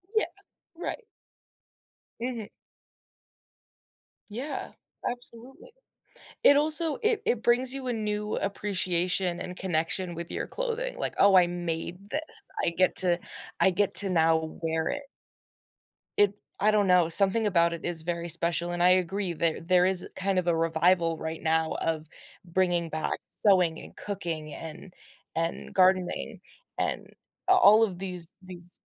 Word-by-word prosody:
Yeah. 440 - +2 0.5
Right. 470 +7 -6 1.2
Mhm. 235 -3 -5 1.8
Yeah, 255 +8 -6 0.4
absolutely. 245 - -11 0.7
It 285 - +6
also 310 +1 +5
it 445 -1 +1
it 235 -2 0
brings 250 +2 +3
you 265 -2 -6
a 245 - -1
new 210 -1 -3
appreciation 185 -3 -1
and 180 - -7
connection 175 0 -2
with 170 0 -7
your - - -5
clothing, - - -4
like, - - -4
oh, 195 -1 +5
I 175 -1 +5
made 175 +3 -6
this. 305 - -3 0.4
I - - +2
get 185 +2 +1
to 175 -2 +1 0.4
I - - +5
get 200 +2 0
to 200 -2 +4
now 160 -2 0
wear 160 0 -2
it. 285 0 -4 1.1
It 205 -1 +3 0.3
I 215 +2 +3
don't 205 -2 +1
know, 180 -2 +4
something 200 +5 +7
about 170 -3 +2
it 170 - -8
is 170 -2 +4
very 170 0 -4
special, 170 +1 +5
and 175 0 -1
I 180 - +5
agree 185 +1 0
that 165 0 -2
there 180 0 +4
is 185 -1 +5
kind 190 0 -1
of 180 -1 0
a 170 - +2
revival 165 +1 +1
right 160 0 -6
now 160 0 0
of 160 -1 -3 0.3
bringing 175 -1 -1
back 155 0 -3 0.3
sewing 180 -4 +3
and - - -14
cooking 165 -7 -5
and 165 +3 -10 0.4
and 165 +1 -3
gardening 185 -1 0 0.4
and - - -3 0.4
a 375 - +5
all 220 - +6
of 190 -5 -2
these 180 -3 -5
these 180 -2 -11
185 Hz, 145 wpm, -26 LUFS, 170-210 Hz, 1.8 s, something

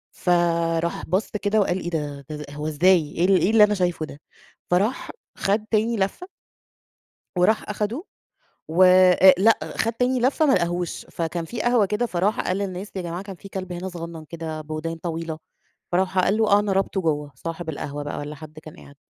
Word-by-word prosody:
فراح 170 -1 +1
بَص 185 +5 0
كده 210 0 0
وقال: 190 -2 +1
"إيه 175 - -4
ده؟ 145 -4 -4
ز 150 0 -5
هو 150 +1 -5
إزاي، 160 0 +3
إيه 170 - 0
ال 190 0 +5
إيه 185 - +3
اللي 220 -1 +7
أنا 210 0 +4
شايفه 175 -4 -1
ده؟! 150 0 -12 0.5
فراح 200 +8 0 0.3
خَد 210 +2 0
تاني 225 +2 +1
لفّة. 200 - -2 1.1
وراح 185 +6 +2
أخده 210 - -2 0.6
و 170 +4 +4
أ 185 0 +7
لأ، 220 +5 +5 0.2
خَد 230 - 0
تاني 250 +2 +1
لفّة 270 +6 +2
ما 275 - +4
لقهوش. 175 0 -1
فكان 165 0 -4
في 230 +6 -5
قهوة 240 -3 +3
كده، 210 +5 -1
فراح 195 0 0
قال 185 - -1
للناس: 195 0 -4
"يا 190 - -2
جماعة، 175 +1 -5
كان 195 -1 -8
في 195 +2 -12
كلب 185 -2 -6
هنا 180 +2 -5
صغنّن، 170 -2 -8
كده 160 0 -6
بودان 155 +2 -5
طويلة." 165 -1 -4 0.5
فراح 185 +1 +1
قال 195 +3 +2
له: 220 -1 +2
"آه، 200 - +6
أنا 205 -1 -1
رابطه 195 0 0
جوّه." 150 -3 -1
صاحب 165 +4 -6
القهوة 145 -1 -5
بقى 145 - -5
والّا 145 +1 -6
حد 155 0 -11
كان 155 0 -12
قاعد. 140 - -15
180 Hz, 190 wpm, -23 LUFS, 165-205 Hz, 1.1 s, اللي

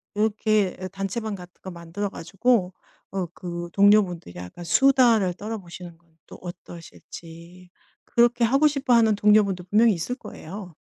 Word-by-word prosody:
이렇게 215 -2 +1
단체방 195 +3 -4
같은 180 -1 -12
거 190 - -7
만들어 170 +4 -5
가지고 190 +2 0 0.4
어 190 -2 -2
그 175 -1 -6
동료분들이 200 - +3
약간 90 - -9
수다를 235 -4 +4
떨어 215 +4 -6
보시는 175 -3 -11
건 170 -1 -34
또 - - -12
어떠실지. 175 0 -12 0.4
그렇게 240 0 +3
하고 275 +6 +3
싶어 275 -3 0
하는 225 -2 +5
동료분도 205 -3 +2
분명히 225 +3 +4
있을 185 +8 -4
거예요. 185 - -10
195 Hz, 325 characters per minute, -24 LUFS, 175-220 Hz, 0.4 s, 하는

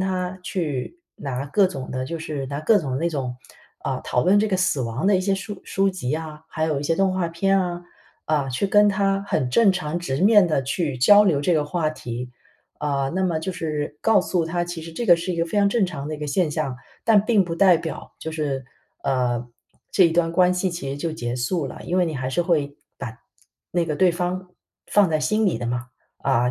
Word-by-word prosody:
他 185 -1 -2
去 170 - -3 0.2
拿 135 -1 -4
各 195 +7 +3
种 135 -8 -6
的 130 0 -3
就 165 +5 -4
是 150 -4 -4
拿 140 +2 -4
各 210 +7 +4
种 135 -7 -3
那 170 +2 +1
种 130 -5 -3 0.4
啊， - - -3
讨 125 - 0
论 195 +3 +5
这 215 +1 +2
个 190 - +1
死 180 -6 +1
亡 120 +7 -2
的 205 - +5
一 185 - +1
些 195 +1 0
书 200 0 -6
书 195 0 +1
籍 180 -9 -3
啊， 155 -1 -5
还 155 - -2
有 155 -3 0
一 - - -4
些 165 +2 0
动 195 -1 +2
画 185 -2 -1
片 195 +4 +2
啊， 175 -1 -3 0.4
啊， 145 -3 0
去 130 +10 -1
跟 205 +1 +5
他 195 -1 +1
很 125 - 0
正 205 - +5
常、 175 -3 -2
直 170 -6 -2
面 205 -1 +7
地 155 - +1
去 140 0 -1
交 205 +11 +7
流 165 -8 +2
这 170 +4 +2
个 150 -2 +2
话 155 +1 -1
题。 125 -4 -6 0.5
呃， 140 -2 -1
那 190 - +1
么 170 -3 0
就 165 - -3
是 150 -3 -3
告 225 -1 +5
诉 175 -3 0
他， 175 +1 -1
其 175 -2 -5
实 165 - -9
这 235 +8 -4
个 175 -3 +7
是 170 +2 -3
一 - - -4
个 165 - +1
非 210 - -4
常 200 -1 +4
正 200 -1 +2
常 145 -5 -6
的 155 - -3
一 - - -8
个 150 - -4
现 165 +2 +1
象， 135 -3 -2 0.3
但 215 -3 +5
并 220 -4 +4
不 170 -2 -4
代 180 +1 +6
表 165 -1 -7
就 160 - -5
是， 145 -5 -3 0.4
呃， 125 -2 0 0.4
这 185 - +5
一 165 - 0
段 165 -1 +2
关 180 +1 +4
系 180 +1 0
其 170 -6 -5
实 135 - -3
就 160 +3 -3
结 120 -6 -4
束 140 +5 -1
了， - - -9
因 180 - -1
为 180 - +4
你 160 -2 -3
还 130 -1 -3
是 130 +7 0
会 150 -5 0 0.2
把 115 -4 -6 0.5
那 170 -1 0
个 150 -2 -2
对 185 -2 +4
方 180 +1 -3 0.4
放 205 -3 +4
在 155 - +1
心 215 +7 +1
里 180 - +1
的 - - -5
嘛， 120 +1 -2 0.3
啊， 125 -2 +2
165 Hz, 255 characters per minute, -23 LUFS, 140-185 Hz, 0.5 s, 面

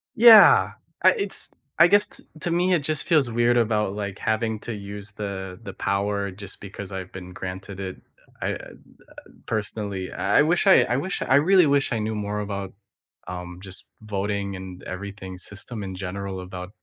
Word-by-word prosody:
Yeah. 225 -1 +8 0.3
I - - +8
it's 415 -5 +2 0.2
I 170 - +8
guess, 205 +2 +4
t - - -9 0.2
to 175 - -1
me, 180 +2 +2
it 150 -5 0
just 155 -2 +1
feels 150 -8 +4
weird 120 +1 +2
about, 105 -4 +1
like, 100 -2 -5
having 110 0 -1
to 120 - -5
use 100 0 -6
the 95 -3 -6
the 100 -3 -7
power 100 +1 -1
just 100 +1 -5
because 100 0 -8
I've 95 -1 -6
been 90 -1 -9
granted 95 +2 -7
it. 95 -1 -5 0.4
I - - -1
I, - - 0
uh, - - -9 0.8
personally, 100 -3 -2
I - - +2
wish, 175 +5 +1
I 190 - +7
I 125 - 0
wish 185 +8 -3
I 130 - +3
really 180 +5 +5
wish, 140 -2 +2
I 115 - -1
knew 110 +1 -2
more 105 0 -3
about, 100 -2 -4 0.5
um, 90 0 -7
just 95 -1 -5 0.2
voting 100 -1 -3
and 95 -1 -9
everything 95 0 -7
system 105 +4 -5
in 95 -1 -6
general 95 0 -5
about 90 0 -7
100 Hz, 180 wpm, -24 LUFS, 95-120 Hz, 0.8 s, Yeah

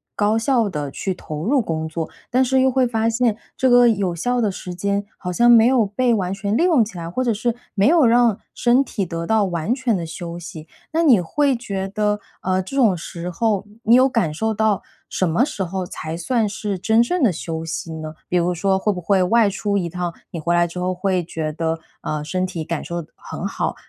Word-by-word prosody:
高 210 +1 +2
效 230 -2 +2
地 150 -5 -4
去 190 +6 -3
投 155 -3 -6
入 265 +3 +3
工 160 -5 -3
作。 165 0 -4 0.2
但 255 +2 +4
是 260 +1 +2
又 265 - +3
会 255 -1 +2
发 225 -1 0
现 230 -1 +1 0.2
这 260 - +3
个 245 0 +7
有 195 -5 0
效 245 +9 0
的 220 -4 +2
时 180 -1 -7
间 200 +3 -1
好 180 -1 -4
像 240 +6 +4
没 230 -1 +7
有 250 -3 +3
被 235 +5 +1
完 190 -4 -1
全 200 +2 -2
利 330 - +3
用 320 -11 +4
起 210 -4 -10
来， 165 -1 -5
或 215 +9 -2
者 240 -2 +1
是 230 +3 -1 0.2
没 200 -1 +2
有 320 -4 +5
让 235 -2 +4
身 245 +2 +3
体 205 -7 -3
得 165 0 -4
到 220 -2 +3
完 175 +3 -1
全 260 -4 0
的 170 - -4
休 170 +1 -7
息。 160 -2 -9 0.3
那 330 - +2
你 260 - +6
会 280 - +1
觉 195 -5 -4
得， 210 +1 0 0.2
呃， 185 0 +1
这 270 +9 -6
种 225 -8 +4
时 170 +1 -6
候 205 +2 0 0.2
你 230 +2 +5
有 255 +1 +6
感 225 - 0
受 220 +7 -1
到 215 -2 +1 0.3
什 185 - 0
么 195 +10 +3
时 200 - -4
候 185 +1 -3
才 160 -2 -6
算 220 +6 0
是 205 -1 -3
真 220 +5 +3
正 355 +9 -1
的 225 - +5
休 165 0 -5
息 165 0 -4
呢？ 155 -1 -6 0.2
比 180 - +2
如 175 +1 +1
说 190 +2 +1
会 210 - +1
不 180 - -5
会 190 +2 +2
外 215 +3 +4
出 200 +1 -1
一 175 -3 -1
趟， 175 0 -3 0.2
你 170 - -5
回 170 +2 0
来 175 0 +4
之 170 - -10
后 185 +1 -1
会 185 0 0
觉 160 -2 -4
得， 160 +1 -2 0.2
啊， 155 -1 -3
身 185 +4 -1
体 175 -3 -5
感 170 -1 -3
受 170 0 -4
的 155 - -14
很 - - -7
好， - - -2
200 Hz, 255 characters per minute, -21 LUFS, 175-235 Hz, 0.3 s, 个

